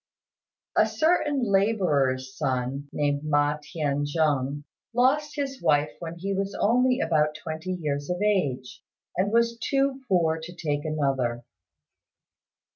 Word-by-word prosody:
A - - +5
certain 300 -4 +1
labourer's 160 - +1
son, 135 0 -2
named 145 -1 0
Ma 145 0 +1
T'ien 145 -2 -2
jung, 145 -2 0 0.3
lost 280 +5 +2
his 275 -2 -3
wife 150 0 +2
when 170 -1 -6
he 195 +3 -2
was 195 +1 -2
only 250 +3 +3
about 150 -2 +1
twenty 160 +3 -5
years 145 -4 -3
of 180 0 -1
age, 150 -12 0 0.3
and 195 +3 +1
was 235 0 +2
too 275 0 0
poor 165 -5 +2
to 175 +2 -9
take 145 -3 -2
another. 135 -6 -1
160 Hz, 125 wpm, -26 LUFS, 145-210 Hz, 0.3 s, A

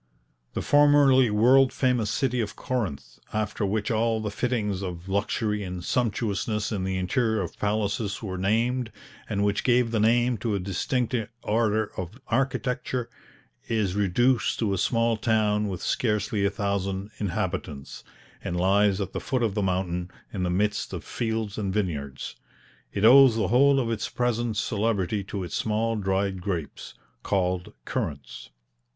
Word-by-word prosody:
The - - -3
formerly 145 -3 +5
world 125 +5 +5
famous 125 -5 +1
city 125 +2 0
of 105 -1 -4
Corinth, 95 - -4
after 110 -1 -2
which 105 +2 -1
all 115 0 +1
the 105 -1 -3
fittings 105 -4 -1
of 90 -2 -6
luxury 105 +1 -1
and 90 -2 -5
sumptuousness 105 -2 -1
in 100 -4 -2
the 95 0 -1
interior 110 +4 +1
of 90 - -6
palaces 105 0 -1
were 95 -3 -4
named, 115 +5 0 0.4
and 100 -2 0
which 100 0 +1
gave 125 -2 +3
the 115 - +1
name 120 +2 +3
to 110 -4 -1
a - - -1
distinct 105 +7 -1 0.3
order 110 -1 +1
of 95 +7 -6
architecture, 125 -1 -1 0.6
is 105 -5 0
reduced 105 +4 +2
to 105 -4 0
a - - 0
small 115 +1 +2
town 105 -2 +1
with 95 -3 -5
scarcely 105 -3 0
a - - +3
thousand 100 0 -2
inhabitants, 90 -8 -4 0.4
and 85 - -3
lies 100 +2 +3
at 95 -2 -4
the - - -2
foot 130 -2 -1
of 110 -4 +1
the 105 - -1
mountain, 90 -2 -1 0.2
in 100 - -3
the 90 - 0
midst 105 +4 0
of - - -5
fields 110 -2 -3
and 100 -2 -2
vineyards. 70 -9 -3 0.6
It 100 +1 0
owes 130 0 +8
the 110 - 0
whole 135 +4 +5
of 115 -3 -1
its 110 - -2
present 120 -2 -1
celebrity 105 -2 0
to 100 -1 -4
its 90 - -5
small 110 +1 0
dried 95 -2 -1
grapes, 90 -5 -5 0.3
called 90 +1 -1
currants. 85 - -4
105 Hz, 155 wpm, -26 LUFS, 95-115 Hz, 0.6 s, owes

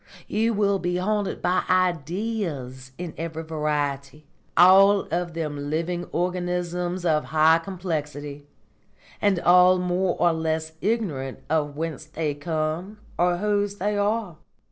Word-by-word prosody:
You 225 +1 +1
will 200 -1 +2
be 175 0 -1
haunted 205 +1 -1
by 180 +1 +2
Ideas 170 - -1
in 175 -2 -6
every 165 -1 -4
variety, 150 -2 -3 0.3
all 195 +3 +7
of 175 0 -2
them 145 -3 -4
living 170 +3 -2
organisms 180 0 -2
of 155 -2 +2
high 160 +1 +4
complexity, 150 -5 -5 0.7
and 200 -3 +3
all 180 +1 +6
more 180 0 0
or 175 -1 +4
less 160 0 -2
ignorant 170 - -2
of 150 -2 0
whence 160 -2 -4
they 155 -1 -3
come 160 +6 -3 0.2
or 175 0 +3
whose 205 0 0
they 205 +1 -1
are. 205 -4 -1
175 Hz, 125 wpm, -24 LUFS, 155-185 Hz, 0.7 s, all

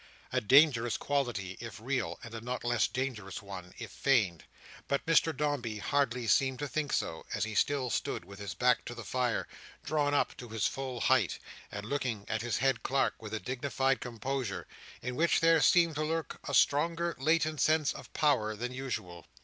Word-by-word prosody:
A - - +2
dangerous 120 -1 +5
quality, 120 -10 -2
if 115 -1 -8
real; 130 +1 -2
and 115 - -9
a 115 - -5
not 125 +2 -4
less 120 -1 +2
dangerous 115 -8 -4
one, 95 -3 -9
if - - -7
feigned. 110 -12 +1 0.4
But 140 - 0
Mr 165 0 +4
Dombey 140 -7 -1
hardly 125 +1 0
seemed 130 +4 +3
to 145 - -3
think 150 +1 -2
so, 80 - -1
as 105 - 0
he 110 0 -3
still 130 +2 +1
stood - - -2
with 100 +2 -12
his 100 -4 -5
back 125 +5 +3
to 120 - -6
the 115 - -7
fire, 125 0 -1 0.4
drawn 145 -1 +1
up - - +1
to 120 - -9
his 110 -2 -1
full 130 -3 -3
height, 130 -8 +3 0.3
and 100 0 -6
looking 120 -5 -2
at 110 - -1
his 120 0 -1
head 130 -1 +1
clerk 135 -2 0
with 110 0 -5
a - - -2
dignified 135 +4 0
composure, 125 -2 -3 0.4
in 125 +1 -3
which 170 +5 +3
there 165 -1 +5
seemed 170 0 +5
to 155 - 0
lurk 160 +1 -2
a - - 0
stronger 165 +3 +2
latent 155 0 +2
sense 155 -2 +3
of - - -11
power 110 -8 +2
than 125 +4 -4
usual. 105 -10 -5
125 Hz, 190 wpm, -31 LUFS, 110-145 Hz, 0.4 s, dangerous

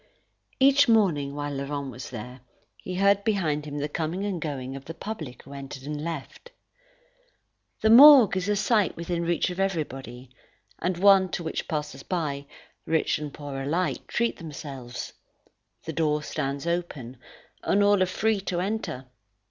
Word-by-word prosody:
Each 275 +1 +6
morning, 160 -11 +2
while 145 0 -3
Laurent 140 0 -4
was 125 +1 -8
there, 125 +2 -8 0.4
he 185 - -6
heard 200 +1 +3
behind 160 -9 0
him 145 -1 -6
the 145 0 -1
coming 165 +6 -3
and 190 -5 -3
going 135 -4 -4
of 135 0 -9
the 165 - -7
public 160 - -7
who 140 - -12
entered 135 -1 -8
and 150 +1 -5
left. 165 - -6 1.3
The 220 - +4
morgue 260 -4 +9
is 185 +1 -1
a 210 - +2
sight 210 -2 +2
within 170 0 -2
reach 170 +1 0
of 180 - -7
everybody, 135 -9 -3 0.5
and 180 0 -1
one 195 0 +6
to 175 - -2
which 160 - -4
passers 150 -3 -4
by, 145 -6 -3 0.4
rich 160 -2 +1
and 150 -1 -5
poor 140 -2 -6
alike, 165 +7 -1
treat 235 0 0
themselves. 140 -6 -7 0.7
The 160 - -5
door 150 -1 0
stands 140 0 -3
open, 160 -8 -3 0.4
and 205 +1 +2
all 205 -1 +4
are 185 - +3
free 215 +3 0
to 180 -2 -2
enter. 190 -9 -3
160 Hz, 160 wpm, -26 LUFS, 140-195 Hz, 1.3 s, morgue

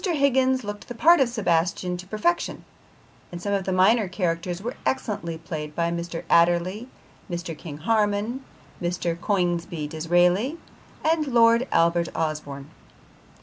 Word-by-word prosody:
Higgins 265 - +2
looked 205 0 -7
the 245 - -7
part 335 +8 +6
of 265 -3 +3
Sebastian 180 -4 0
to 180 +1 -10
perfection, 340 - -1 0.7
and 175 - -6
some 200 +3 -2
of 195 -2 -1
the 190 - -1
minor 195 +4 +4
characters 175 -1 -2
were 235 +5 -4
excellently 200 -10 -2
played 155 -2 -6
by 170 0 0
Mr. 170 -1 -4
Adderley, 175 +7 +2 0.4
Mr. 175 -1 -4
King 150 -2 -8
Harman, 215 - 0 0.4
Mr. 175 -1 -1
Coningsby 175 -5 -1
Disraeli 175 - +1 0.5
and 315 -1 +2
Lord 235 0 +4
Albert 170 0 +2
Osborne. 150 -3 -4
185 Hz, 135 wpm, -24 LUFS, 170-230 Hz, 0.7 s, part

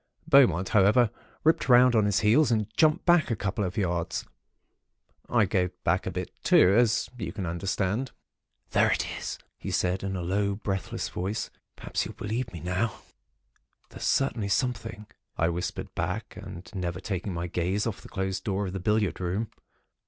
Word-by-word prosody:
Beaumont, 110 - +5
however, 110 +3 +4 0.3
ripped 160 -3 +2
round 125 0 +7
on 110 -2 +4
his 105 +2 +2
heels, 120 +8 +4
and 110 -3 +1
jumped 155 -1 +3
back 175 -5 +4
a 115 - +1
couple 100 +1 -2
of 90 0 -3
yards. 85 -4 -1 1.0
I 115 -3 +4
gave 90 -2 +1
back 90 +3 +1
too, - - -1
a - - -5
bit, 90 0 -4 0.2
as 115 +5 +5
you - - -3
can 100 -3 -4
understand. 95 +7 -1 0.6
"'There - - +4
it - - -1
is,' - - -5 0.2
he - - -5
said, 90 +1 0
in 95 0 -3
a 90 - -3
low, 100 +3 0
breathless 95 -3 -3
voice. 100 +5 -3 0.2
'Perhaps - - -2
you'll - - -7
believe 115 +3 -3
now.' 90 +6 -2 0.9
"'There's - - -11
certainly 115 -7 +1
something,' 105 -3 -1 0.3
I 80 - +2
whispered 85 +1 -4
back, - - -3
and 85 0 -9
never 90 -2 -3
taking 95 -1 -3
my 85 +1 -2
gaze 90 +4 -1
off 115 -4 -3
the - - -13
closed 95 0 -3
door 100 0 -1
of 95 - -5
the 95 - -3
billiard 105 0 +1
room. 95 +5 -2
100 Hz, 170 wpm, -27 LUFS, 90-110 Hz, 1.0 s, round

